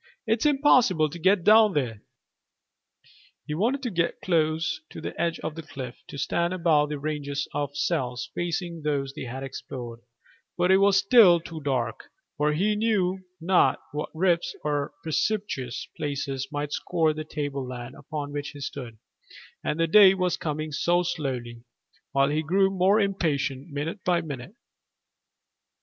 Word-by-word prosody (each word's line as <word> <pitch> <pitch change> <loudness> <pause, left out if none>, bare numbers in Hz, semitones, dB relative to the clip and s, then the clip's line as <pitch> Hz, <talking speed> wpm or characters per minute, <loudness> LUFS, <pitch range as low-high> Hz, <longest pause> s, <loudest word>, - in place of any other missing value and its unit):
"It's 225 +5 +2
impossible 250 - +4
to 175 - -8
get 190 +2 +3
down 215 0 +6
there." 120 -8 -2 1.4
He 150 - -4
wanted 240 - 0
to 245 - -2
get 170 -2 0
close 160 -2 0
to - - -9
the - - -5
edge 170 -1 0
of 155 - -4
the 165 - -7
cliff, 130 -5 -8
to - - -9
stand 170 +5 0
above 155 -4 +3
the 150 - -3
ranges 145 -1 -3
of 145 -1 -3
cells 125 -1 -1
facing 175 -1 -3
those 140 -2 -1
they - - -6
had 130 +2 -6
explored; 125 -3 -7 0.6
but 180 +1 +3
it 190 - +7
was 195 0 +4
still 200 -3 +7
too 165 -1 -8
dark, 125 -5 -2 0.3
for 150 +1 +1
he 205 +7 +1
knew 205 -4 +1 0.2
not 180 +2 +3
what 150 +1 -4
rifts 170 0 +1
or 145 -1 -1
precipitous 160 - -2
places 140 -3 -3
might 145 0 -3
score 160 0 +1
the 155 0 -5
tableland 135 -5 -5
upon 145 -1 -6
which 145 0 -3
he - - -8
stood; 130 -5 -6 0.7
and 150 - -2
the 165 - +4
day 195 +3 +7
was 180 -2 0
coming 155 0 -4
so 175 +4 +2
slowly, 130 -9 -4 0.5
while 140 0 +3
he 150 +2 0
grew 190 +5 +2
more 195 +3 +3
impatient 155 -7 -1
minute 155 +6 -4
by 175 -1 +2
minute. 155 - -7
155 Hz, 155 wpm, -26 LUFS, 140-185 Hz, 1.4 s, it